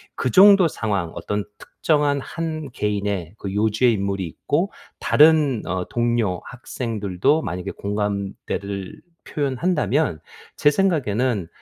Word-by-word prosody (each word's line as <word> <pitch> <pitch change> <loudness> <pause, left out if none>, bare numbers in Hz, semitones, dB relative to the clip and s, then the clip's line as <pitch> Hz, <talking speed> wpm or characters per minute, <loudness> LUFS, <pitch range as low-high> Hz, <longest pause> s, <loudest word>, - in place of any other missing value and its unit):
그 - - -1
정도 195 -2 +7
상황 100 - -2
어떤 105 0 -3 0.2
특정한 145 -2 0
한 155 -2 -5
개인의 100 -5 -2
그 100 -2 -6
요주의 110 +4 +2
인물이 100 -2 -2
있고 80 - -2 0.3
다른 150 -6 +4
어 90 0 -2
동료, 120 -6 0
학생들도 115 - -1
만약에 90 0 -4
공감대를 100 -1 -4 0.3
표현한다면 150 - 0 0.4
제 145 - +4
생각에는 130 - 0
110 Hz, 255 characters per minute, -22 LUFS, 100-145 Hz, 0.4 s, 정도